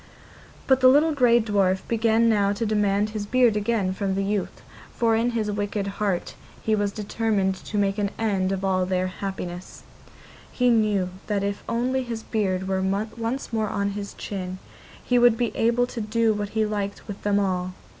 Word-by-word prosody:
But 265 -1 +4
the 255 - +7
little 295 +5 +5
grey 245 -4 +4
dwarf 200 -4 +1
began 230 0 +2
now 205 -3 +3
to 225 +3 -2
demand 210 -1 +1
his 210 -1 -4
beard 245 -2 +3
again 210 -3 0
from 190 0 -2
the 195 - 0
youth, 200 0 -3 0.3
for 230 -1 +2
in 230 +2 +2
his 215 -2 -1
wicked 205 0 -2 0.2
heart 195 -4 -1 0.3
he 220 - +1
was 205 -1 +1
determined 210 -2 0
to 210 - -4
make 200 0 +1
an 200 -1 0
end 195 -4 0
of 195 0 -2
all 185 -1 +1
their 185 0 0
happiness; 185 -1 -6 0.7
he 250 -1 +2
knew 210 -5 +2 0.2
that 205 -2 0
if 200 0 -3
only 255 +3 0
his 230 -3 -5
beard 190 -4 -1
were 190 0 0
once 225 +6 -2
more 220 -2 0
on 200 0 -1
his 200 0 -6
chin, 185 -2 -5 0.5
he 245 -1 +2
would 240 -2 +5
be 240 -1 -1
able 235 +2 +2
to 240 -1 -6
do 220 +1 +1
what 205 -1 -3
he 220 - +3
liked 205 -1 -4
with 205 -2 -7
them 205 0 +2
all. 185 -2 -1
210 Hz, 185 wpm, -24 LUFS, 195-230 Hz, 0.7 s, the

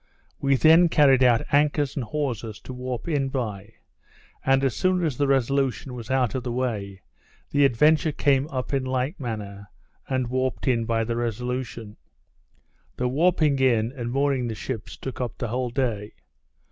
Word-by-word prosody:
We 140 0 +2
then 165 +5 +6
carried 140 -5 +5
out 120 -2 +4
anchors 145 -1 +2
and 135 - -2
hawsers, 115 -4 -3
to 130 - -8
warp 125 +1 -5
in 140 -4 0
by; 110 -5 -4 0.7
and, 135 0 +3
as 130 -5 +1
soon 185 -1 +1
as 150 -5 -1
the 140 +3 +1
Resolution 135 -1 0
was 120 -1 -8
out 130 -4 +1
of 130 - -2
the 125 - -4
way, 105 -7 -3 0.5
the 145 0 +4
Adventure 150 +5 +3
came 140 -1 +2
up 130 -2 -4
in 135 -1 +1
like 130 +5 -2
manner, 105 -5 -6 0.4
and 130 -1 0
warped 130 +2 -2
in 115 -3 +2
by 115 0 0
the 115 +1 -2
Resolution. 120 -1 -4 1.0
The 125 - 0
warping 155 -1 +2
in, 120 -3 +2
and 120 -3 -5
mooring 135 -2 +1
the 115 - -4
ships, 110 0 -6
took 130 -1 -6
up 120 -2 -4
the 120 - -3
whole 125 +2 -1
day. 115 -5 -2
130 Hz, 170 wpm, -25 LUFS, 115-140 Hz, 1.0 s, then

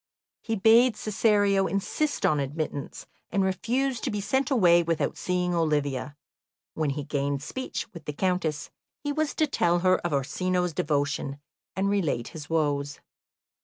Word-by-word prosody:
He 225 - -2
bade 225 +4 +5
Cesario 205 -2 +2
insist 200 - -1
on 155 -6 +3
admittance, 145 0 -4 0.3
and 195 - +2
refuse 235 +7 0
to - - -1
be 210 - -2
sent 265 +8 0
away 180 -10 +5
without 165 -1 -1
seeing 180 -1 -1
Olivia. 145 -3 -1 0.6
When 155 -2 -1
he 145 +1 -3
gained 140 -1 -2
speech 260 - -4
with 170 - -10
the 150 - -4
Countess, 165 -3 -1 0.3
he 290 - -1
was 310 0 -1
to 310 - +3
tell 175 - +1
her 185 0 +5
of 175 - -3
Orsino's 180 +5 0
devotion, 145 -1 -1 0.4
and 190 +1 0
relate 170 -12 0
his 150 -2 -9
woes. 145 -3 0
175 Hz, 150 wpm, -27 LUFS, 145-205 Hz, 0.6 s, bade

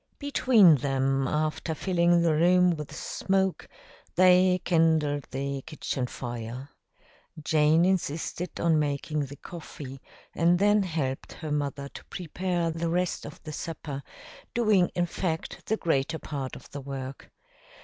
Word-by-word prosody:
Between 235 - +5
them, 135 0 0
after 155 +2 -1
filling 175 -1 +2
the 165 -2 +3
room 180 +3 +4
with 150 -3 -5
smoke, 190 -1 -1 0.5
they 185 0 +5
kindled 160 -4 +2
the 140 +1 -3
kitchen 140 -4 -3
fire. 120 +2 -6 0.7
Jane 155 +2 +3
insisted 180 -1 -2
on 165 -2 +3
making 145 0 -1
the 140 - -9
coffee 145 -4 -9 0.3
and 170 +1 +3
then 205 +2 +4
helped 155 -8 -3
her 155 -3 -6
mother 140 -1 -2
to - - -11
prepare 175 0 -2
the 165 +1 -2
rest 180 -1 -1
of 145 - -12
the 155 -1 -7
supper, 145 -3 -5 0.5
doing, 215 -6 +4
in 175 - +2
fact, 165 -2 -4
the 220 - +1
greater 160 -2 0
part 140 -5 -5
of - - -13
the 140 - -6
work. 135 -1 -7
160 Hz, 135 wpm, -27 LUFS, 140-180 Hz, 0.7 s, Between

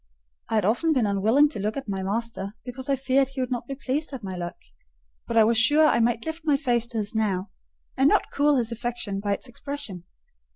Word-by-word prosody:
I 225 - 0
had 210 -3 +2
often 280 +10 +2
been 255 -6 +2
unwilling 215 +9 +4
to 285 - -6
look 210 +4 -2
at 270 - -5
my 195 -2 -2
master, 200 0 -3
because 260 +2 -7
I 275 - +3
feared 270 +1 +2
he 270 0 -8
could 255 - -3
not 240 -1 -3
be 275 - -4
pleased 275 +3 -2
at 255 -5 -6
my 190 -1 -5
look; 175 -1 -5 0.7
but 230 - -1
I 225 - +8
was 225 +1 +4
sure 295 +7 +6
I 300 - +4
might 230 0 +1
lift 320 +1 -5
my 295 -3 +3
face 240 -4 0
to 235 -1 -6
his 210 0 -2
now, 205 -3 -1 0.4
and 270 +2 +4
not - - +2
cool 290 +1 +3
his 240 -3 0
affection 235 -4 -3
by 200 0 0
its 230 - -5
expression. 245 -8 -7
235 Hz, 235 wpm, -25 LUFS, 210-275 Hz, 0.7 s, I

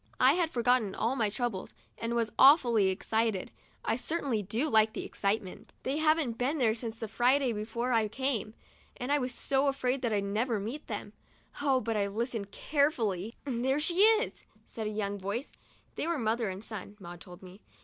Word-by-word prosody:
I - - +6
had 345 -2 +1
forgotten 240 -6 +1
all 235 +4 0
my 225 -5 +1
troubles, 225 -3 -4 0.2
and 230 +1 -3
was 230 -2 0
awfully 245 - +6
excited. 220 +1 0 0.3
I - - +1
certainly 270 -5 -1
do 220 +9 -1
like 220 -5 +3
excitement. 200 -2 -3
They 270 +3 -1
haven't 310 -6 +2
been 280 +5 0
here 225 -4 +3
since 225 -1 -4
the 225 - -5
Friday 245 +3 +2
before 235 +4 -3
I 225 -3 +3
came, 230 -2 -2 0.4
and 250 +3 -3
I 290 - +4
was 255 -1 -2
so 270 +3 +1
afraid 270 -1 0
that 235 -3 0
I'd 205 -2 +1
never 215 +3 0
meet 235 +9 -6
them! - - -5 0.5
Oh! 270 -3 +2
but 225 +1 -2
I 200 -1 +1
listened 220 0 -3
carefully. 230 - 0
There 265 +1 0
she 340 +4 0
is!" 440 +3 +4 0.2
said 220 -2 -5
a - - -1
young 205 -1 -3
voice 205 +8 -4 0.4
(they - - -3
were 340 -1 0
mother 225 -2 0
and 190 +2 -6
son, 210 -2 -7
Maud 175 -2 -10
told 180 0 -12
me). 185 +3 -13
230 Hz, 185 wpm, -30 LUFS, 210-270 Hz, 0.5 s, I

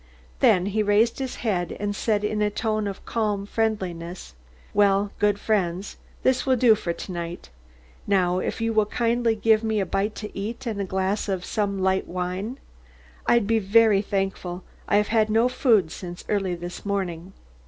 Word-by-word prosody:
Then 180 0 +4
he 205 +2 0
raised 210 +4 +2
his 265 -2 -3
head 180 -6 -1
and 205 0 -2
said, 210 -1 0
in 210 0 -1
a 210 - +3
tone 215 0 -1
of 200 -1 -7
calm 210 -3 -1
friendliness: 185 - -3 0.4
"Well, 200 0 +3
good 205 -1 +3
friends, 190 -3 -1 0.3
this 260 -1 +2
will 260 -1 +3
do 240 -2 +6
for 205 -5 -2
to 170 +3 -7
night. 170 - -6 0.6
Now, 185 -2 +2
if - - -3
you 225 0 0
will 215 -1 +3
kindly 235 0 +1
give 220 +1 +3
me 220 -1 0
a 195 - 0
bite 195 +4 -1
to 210 - -7
eat 225 +6 -5
and 215 -4 -2
a - - -1
glass 190 +3 -1
of 185 -2 -2
some 205 -3 -1
light 190 0 +1
wine, 185 +7 -3 0.7
I'd 235 -3 +4
be 225 +2 +2
very 210 0 +4
thankful. 195 -3 -3 0.2
I 205 - +3
have 210 0 +1
had 220 -1 +3
no 225 +3 +4
food 230 - +2
since 175 -1 -8
early 195 -4 0
this 175 +1 -7
morning." 190 -3 -3
205 Hz, 180 wpm, -24 LUFS, 190-220 Hz, 0.7 s, do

